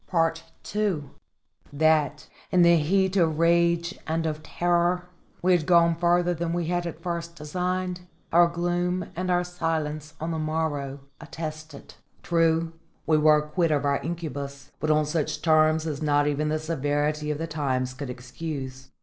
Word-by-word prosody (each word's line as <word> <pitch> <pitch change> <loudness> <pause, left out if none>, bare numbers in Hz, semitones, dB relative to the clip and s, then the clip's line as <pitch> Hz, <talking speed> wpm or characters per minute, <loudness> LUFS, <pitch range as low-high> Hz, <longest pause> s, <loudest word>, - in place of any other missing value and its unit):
II 205 -8 0 0.7
That, 150 0 +2 0.2
in 180 -1 +5
the 170 0 +6
heat 190 +5 +1
of 160 -4 +2
rage 170 +1 +2
and 165 +1 -1
of 155 -1 -2
terror, 175 +3 0 0.4
we 185 - +4
had 175 -4 +2
gone 170 -1 +5
farther 175 +1 +2
than 170 0 -2
we 175 -1 -1
had 175 +1 -1
at 165 0 -8
first 170 -1 -4
designed, 180 +3 -3 0.3
our 175 +1 +7
gloom 175 +1 -1
and 185 +2 -2
our 180 0 +2
silence 160 -3 -3
on 160 +2 -3
the 160 - -2
morrow 150 -3 -2 0.2
attested. 155 -1 -8 0.3
True 165 -1 +2 0.3
we 155 -1 +3
were 150 0 +5
quit 155 +3 0
of 145 -2 +1
our 140 0 +2
incubus, 140 -5 -5
but 155 - -2
on 155 0 +3
such 150 0 -2
terms 155 -1 +4
as 150 -2 -3
not 145 -1 +2
even 150 +1 0
the 155 - +1
severity 150 -1 -1
of 150 - -1
the 165 - -3
times 130 -5 -2
could 135 0 -6
excuse. 130 +1 -6
160 Hz, 160 wpm, -26 LUFS, 150-170 Hz, 0.7 s, our